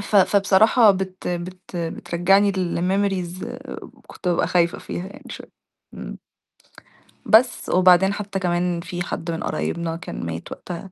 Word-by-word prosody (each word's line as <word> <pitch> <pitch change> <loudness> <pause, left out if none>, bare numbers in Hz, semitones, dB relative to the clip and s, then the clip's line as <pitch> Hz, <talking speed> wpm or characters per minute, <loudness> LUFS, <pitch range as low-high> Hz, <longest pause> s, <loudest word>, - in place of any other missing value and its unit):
ف 205 +1 0
فبصراحة 205 +3 +5
بت 190 -1 -3
بت 180 +1 -6
بترجّعني 175 +4 +1
لmemories 185 0 -1 0.6
كنت 180 - -6
بابقى 175 - +1
خايفة 170 -1 +1
فيها 180 - -6
يعني 200 - -13
شوية، - - -9 0.4
إمم. - - -8 1.1
بس 240 +3 +4
وبعدين 185 +1 +5
حتّى 200 -1 -4
كمان 175 -1 0
في 175 0 -6
حد 170 -1 -4
من 165 - -4
قرايبنا 170 -1 -2
كان 165 - -7
مات 85 0 -6
وقتها 180 +2 -8
185 Hz, 130 wpm, -22 LUFS, 175-195 Hz, 1.1 s, فبصراحة